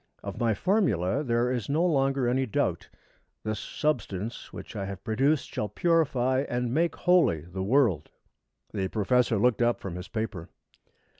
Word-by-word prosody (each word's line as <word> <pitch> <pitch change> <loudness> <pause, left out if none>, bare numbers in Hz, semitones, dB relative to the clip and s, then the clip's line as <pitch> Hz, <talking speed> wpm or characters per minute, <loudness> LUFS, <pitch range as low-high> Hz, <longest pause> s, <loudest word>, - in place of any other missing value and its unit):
Of - - -6
my 115 -3 +2
formula 140 - +1
there 120 -1 +1
is 120 -3 -3
no 160 +5 +2
longer 135 -5 +2
any 130 +2 +1
doubt. 105 - -1 0.5
This 110 -1 -2
substance 115 -7 -3
which - - -9
I 100 -2 -3
have 95 -1 -7
produced 135 +6 +1
shall 105 - -2
purify 135 - +2
and 120 -1 -1
make 165 +4 +1
holy 175 - +3
the 90 +4 -7
world._'" 110 - +2 0.6
The 95 -3 -1
professor 115 +3 +2
looked 120 +2 +2
up 120 0 +2
from 95 - -6
his 90 - -7
paper. 110 -7 -4
120 Hz, 155 wpm, -27 LUFS, 100-135 Hz, 0.6 s, holy